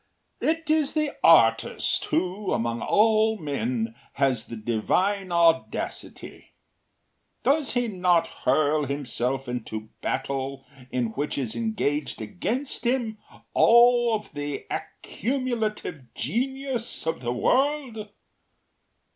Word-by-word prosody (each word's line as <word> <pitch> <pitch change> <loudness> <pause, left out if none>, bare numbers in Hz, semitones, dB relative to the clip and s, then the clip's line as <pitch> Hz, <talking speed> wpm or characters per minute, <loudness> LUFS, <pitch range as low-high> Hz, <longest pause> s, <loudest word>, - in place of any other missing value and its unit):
“It 325 0 0
is 310 -2 +2
the 305 -2 0
artist 115 -9 +4
who, 185 +4 -1
among 115 0 -1
all 220 +1 +3
men, 125 - -2 0.2
has 130 -5 +1
the 115 - -7
divine 180 - 0
audacity. 165 -1 -1 0.9
Does 285 -1 +2
he 245 -1 +1
not 180 -4 +2
hurl 150 +2 +1
himself 135 -1 -2
into 120 -3 -4
a 110 0 -12
battle 135 0 -3 0.2
in 125 -3 -1
which 145 +6 -3
is 125 -6 -2
engaged 180 -10 -1
against 235 - -3
him 235 -3 0 0.3
all 240 0 +6
of 210 -5 -7
the 145 -1 -4
accumulative 220 - -3
genius 260 -2 -2
of 160 -5 -2
the 120 -1 -2
world? 250 - 0
175 Hz, 105 wpm, -25 LUFS, -, 0.9 s, all